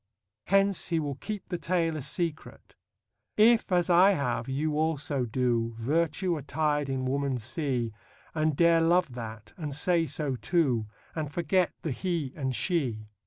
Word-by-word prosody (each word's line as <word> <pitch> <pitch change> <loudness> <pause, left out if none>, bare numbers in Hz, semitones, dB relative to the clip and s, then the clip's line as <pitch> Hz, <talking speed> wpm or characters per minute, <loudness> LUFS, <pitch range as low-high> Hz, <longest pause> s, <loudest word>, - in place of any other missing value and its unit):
Hence 195 0 +2
he 165 -2 +1
will 145 -2 -2
keep 205 +8 -6
the 175 -2 -3
tale 165 -2 0
a 155 - -4
secret: 160 +3 -4 0.6
If, 220 0 +5
as 175 -2 +3
I 185 +3 +6
have, 125 -6 -2
you 150 +3 -1
also 150 -4 0
do, 115 -1 0
Virtue 165 - 0
attir'd 145 0 -1
in 130 -1 -2
woman 135 0 0
see, 125 -1 -2 0.4
And 155 -2 +1
dare 170 -1 +5
love 170 -3 +3
that, 110 -3 -8
and 150 -4 -4
say 165 +2 +2
so 140 -1 -2
too, 130 - +1 0.3
And 155 -3 -4
forget 175 +3 +1
the 160 - -2
He 160 -2 -2
and 130 -4 -2
She. 120 - -1
150 Hz, 155 wpm, -28 LUFS, 130-170 Hz, 0.6 s, I